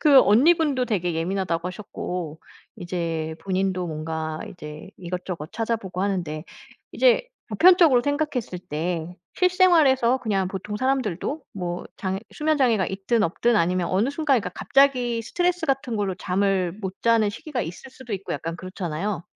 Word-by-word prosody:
그 285 Hz, -4 st, +8 dB
언니분도 275 Hz, +3 st, +4 dB
되게 180 Hz, -7 st, -1 dB
예민하다고 170 Hz, 0 st, -1 dB
하셨고 180 Hz, -5 st, -6 dB, 0.4 s
이제 165 Hz, -3 st, -3 dB
본인도 185 Hz, -1 st, -1 dB
뭔가 160 Hz, 0 st, -4 dB
이제 155 Hz, +2 st, -9 dB
이것저것 180 Hz, -3 st, -5 dB
찾아보고 220 Hz, -5 st, -2 dB
하는데 170 Hz, -6 st, -2 dB, 0.5 s
이제 -, -, +4 dB, 0.2 s
보편적으로 320 Hz, -, +6 dB
생각했을 285 Hz, -, -2 dB
때 170 Hz, +1 st, -4 dB, 0.2 s
실생활에서 320 Hz, -9 st, +4 dB
그냥 195 Hz, -6 st, 0 dB
보통 200 Hz, +2 st, -5 dB
사람들도 260 Hz, -, -1 dB
뭐 175 Hz, -2 st, -4 dB
장애 190 Hz, 0 st, -2 dB
수면 305 Hz, 0 st, 0 dB
장애가 225 Hz, -8 st, +3 dB
있든 200 Hz, +4 st, 0 dB
없든 230 Hz, +7 st, +2 dB
아니면 180 Hz, -1 st, +1 dB
어느 205 Hz, +8 st, +1 dB
순간 285 Hz, -4 st, +2 dB
그러니까 180 Hz, -, -5 dB
갑자기 250 Hz, -4 st, +2 dB
스트레스 355 Hz, +5 st, 0 dB
같은 265 Hz, -4 st, 0 dB
걸로 200 Hz, -2 st, -1 dB
잠을 185 Hz, -1 st, 0 dB
못 190 Hz, -2 st, -5 dB
자는 230 Hz, -3 st, +4 dB
시기가 250 Hz, +4 st, -5 dB
있을 180 Hz, +10 st, -8 dB
수도 255 Hz, -4 st, -10 dB
있고 195 Hz, 0 st, -4 dB
약간 165 Hz, +3 st, -4 dB
그렇잖아요. 185 Hz, 0 st, -4 dB
195 Hz, 355 characters per minute, -24 LUFS, 175-260 Hz, 0.5 s, 그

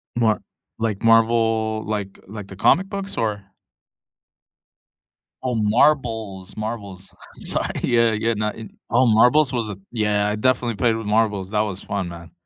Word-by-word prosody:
Mar 110 Hz, -3 st, +2 dB, 0.4 s
like, 110 Hz, -3 st, -2 dB
Marvel, 115 Hz, -1 st, +3 dB
like 105 Hz, -2 st, -4 dB
like 105 Hz, -1 st, -8 dB
the 100 Hz, -, -10 dB
comic 185 Hz, -, +3 dB
books 200 Hz, -1 st, -5 dB
or? 105 Hz, -3 st, -1 dB, 2.0 s
Oh, 125 Hz, -1 st, -1 dB
marbles, 110 Hz, -4 st, +1 dB
marbles, 100 Hz, -4 st, -6 dB, 0.2 s
sorry, -, -, -1 dB
yeah, 115 Hz, -1 st, +3 dB
yeah, 115 Hz, +2 st, 0 dB
not 105 Hz, 0 st, -2 dB, 0.3 s
oh, 125 Hz, +3 st, +4 dB
marbles 125 Hz, +5 st, +4 dB
was 115 Hz, -3 st, -1 dB
a 100 Hz, -, -6 dB
yeah, 105 Hz, -2 st, +1 dB
I 105 Hz, -, -1 dB
definitely 120 Hz, 0 st, +1 dB
played 115 Hz, +1 st, +2 dB
with 110 Hz, -1 st, -5 dB
marbles, 105 Hz, -2 st, 0 dB
that 105 Hz, -, +1 dB
was 100 Hz, -3 st, -4 dB
fun, 100 Hz, -3 st, -3 dB
man. 85 Hz, 0 st, -11 dB
110 Hz, 145 wpm, -22 LUFS, 105-115 Hz, 2.0 s, oh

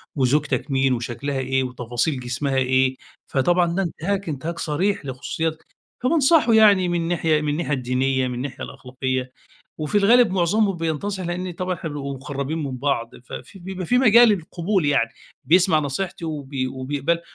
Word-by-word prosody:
وزوجتَك 145 Hz, +2 st, 0 dB
مين 135 Hz, -1 st, +2 dB
وشكلها 125 Hz, +4 st, -3 dB
إيه 130 Hz, 0 st, 0 dB
وتفاصيل 125 Hz, +3 st, -2 dB
جسمها 130 Hz, +2 st, -2 dB
إيه. 130 Hz, 0 st, +2 dB, 0.3 s
فطبعًا 170 Hz, +5 st, +2 dB
ده 195 Hz, -, +1 dB
انتهاك، 190 Hz, +2 st, -3 dB
انتهاك 155 Hz, +4 st, -4 dB
صريح 170 Hz, +3 st, -1 dB
لخصوصياتَك. 155 Hz, +4 st, -3 dB, 0.4 s
فبانصحه 290 Hz, -2 st, +4 dB
يعني 205 Hz, -5 st, +6 dB
من 170 Hz, -1 st, -1 dB
ناحية 165 Hz, -3 st, +1 dB
من 150 Hz, -, -1 dB
الناحية 150 Hz, 0 st, -1 dB
الدينية، 130 Hz, 0 st, 0 dB
من 125 Hz, -, -4 dB
الناحية 125 Hz, +2 st, -5 dB
الأخلاقية، 130 Hz, 0 st, -4 dB, 0.5 s
وفي 155 Hz, +6 st, 0 dB
الغالب 230 Hz, +2 st, +5 dB
معظمهم 195 Hz, +2 st, +1 dB
بينتصح 170 Hz, +4 st, -2 dB
لأن 180 Hz, +1 st, -3 dB
طبعًا 185 Hz, +2 st, -3 dB
إحنا 165 Hz, -, -6 dB
بنبقى 140 Hz, -2 st, -5 dB
مقرّبين 140 Hz, +3 st, -4 dB
من 135 Hz, -2 st, -4 dB
بعض، 125 Hz, -3 st, -1 dB
ففي 195 Hz, -, -9 dB
بيبقى 185 Hz, 0 st, -6 dB
في 245 Hz, -, +2 dB
مجال 240 Hz, -1 st, +7 dB
للقبول 185 Hz, -1 st, 0 dB
يعني 140 Hz, -5 st, +2 dB, 0.3 s
بيسمع 170 Hz, +2 st, +4 dB
نصيحتي 165 Hz, +5 st, -3 dB
وبي 140 Hz, -4 st, -3 dB
وبيقبلها 140 Hz, +6 st, -2 dB
155 Hz, 150 wpm, -22 LUFS, 130-180 Hz, 0.5 s, مجال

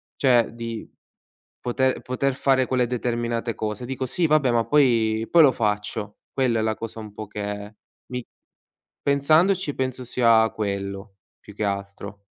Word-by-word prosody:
cioè 125 Hz, -4 st, +3 dB
di 115 Hz, -1 st, -6 dB, 0.7 s
poter 130 Hz, +1 st, 0 dB
poter 130 Hz, +2 st, -1 dB
fare 130 Hz, -1 st, +2 dB
quelle 125 Hz, -1 st, +1 dB
determinate 120 Hz, -1 st, -2 dB
cose. 110 Hz, +3 st, -4 dB
Dico: 130 Hz, +1 st, -3 dB
"Sì, 170 Hz, +6 st, 0 dB
vabbè, 150 Hz, -4 st, +3 dB
ma 115 Hz, -1 st, +2 dB
poi 115 Hz, -6 st, +3 dB
poi 170 Hz, -2 st, +7 dB
lo 135 Hz, -, +6 dB
faccio." 105 Hz, -1 st, -2 dB, 0.2 s
Quella 125 Hz, -4 st, +1 dB
è -, -, +1 dB
la 110 Hz, -1 st, 0 dB
cosa 115 Hz, 0 st, -7 dB
un 105 Hz, -2 st, -9 dB
po' 110 Hz, -1 st, -7 dB
che 105 Hz, +1 st, -6 dB, 0.3 s
mi 125 Hz, -1 st, -5 dB, 0.8 s
pensandoci 155 Hz, +4 st, +3 dB
penso 130 Hz, -1 st, -3 dB
sia 115 Hz, -2 st, +4 dB
quello 100 Hz, -1 st, -4 dB, 0.2 s
più 105 Hz, -, -14 dB
che 105 Hz, -, -3 dB
altro. 100 Hz, 0 st, -4 dB
115 Hz, 150 wpm, -24 LUFS, 105-130 Hz, 0.8 s, poi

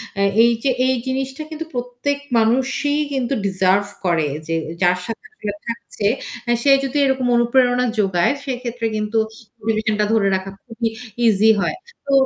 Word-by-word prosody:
অ্যা 200 Hz, -, +2 dB, 0.2 s
এই 235 Hz, -, +5 dB
যে 275 Hz, -, +2 dB, 0.2 s
এই 260 Hz, -, +3 dB
জিনিসটা 265 Hz, +2 st, -2 dB
কিন্তু 320 Hz, +1 st, -5 dB
প্রত্যেক 245 Hz, +3 st, -2 dB, 0.2 s
মানুষই 265 Hz, +5 st, +2 dB, 0.2 s
কিন্তু 260 Hz, -1 st, -1 dB
ডিজার্ভ 190 Hz, +1 st, +2 dB, 0.2 s
করে। 165 Hz, -4 st, +2 dB, 0.2 s
যে 165 Hz, -, -1 dB, 0.3 s
যার 180 Hz, 0 st, +4 dB
সাথে 230 Hz, +2 st, -6 dB
আসলে 210 Hz, -, -5 dB
থাকছে 230 Hz, -3 st, -3 dB, 0.4 s
এ -, -, +4 dB
সে 280 Hz, -, +5 dB
যদি 275 Hz, +2 st, -2 dB
এরকম 265 Hz, -2 st, +1 dB
অনুপ্রেরণা 245 Hz, +1 st, +3 dB
যোগায় 195 Hz, +3 st, +2 dB
সেক্ষেত্রে 245 Hz, -2 st, -4 dB
কিন্তু 215 Hz, +1 st, -1 dB, 0.5 s
রিলেশন 220 Hz, -1 st, +1 dB
টা 210 Hz, -, +3 dB
ধরে 210 Hz, -3 st, +3 dB
রাখা 190 Hz, +1 st, -4 dB
খুবই 230 Hz, -1 st, -3 dB, 0.4 s
ইজি 215 Hz, +1 st, +5 dB
হয়। 355 Hz, -, 0 dB, 0.3 s
তো 280 Hz, -, -3 dB
235 Hz, 155 wpm, -20 LUFS, 205-260 Hz, 0.5 s, এই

